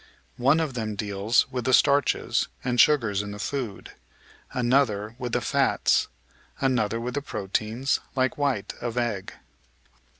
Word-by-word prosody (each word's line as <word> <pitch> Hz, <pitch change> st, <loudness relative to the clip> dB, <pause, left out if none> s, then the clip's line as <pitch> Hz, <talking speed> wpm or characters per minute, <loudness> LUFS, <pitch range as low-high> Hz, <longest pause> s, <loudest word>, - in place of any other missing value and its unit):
One 135 Hz, +6 st, +4 dB
of 155 Hz, -4 st, -1 dB
them 110 Hz, -3 st, -3 dB
deals 100 Hz, +2 st, +1 dB
with 125 Hz, -2 st, -3 dB
the 130 Hz, -, +6 dB
starches 140 Hz, +1 st, +2 dB, 0.2 s
and 125 Hz, -1 st, +4 dB
sugars 115 Hz, -10 st, +3 dB
in 105 Hz, 0 st, -6 dB
the -, -, -7 dB
food, 115 Hz, -2 st, -4 dB, 0.6 s
another 120 Hz, -4 st, +1 dB
with 125 Hz, -2 st, -4 dB
the -, -, +1 dB
fats, -, -, +2 dB, 0.5 s
another 115 Hz, -5 st, +1 dB
with 120 Hz, +1 st, -4 dB
the 145 Hz, -, -1 dB
proteins, 110 Hz, +2 st, -1 dB, 0.2 s
like 130 Hz, -1 st, +1 dB
white 130 Hz, -9 st, -1 dB
of 120 Hz, 0 st, -4 dB
egg. 115 Hz, -6 st, -2 dB
120 Hz, 140 wpm, -26 LUFS, 105-130 Hz, 0.6 s, the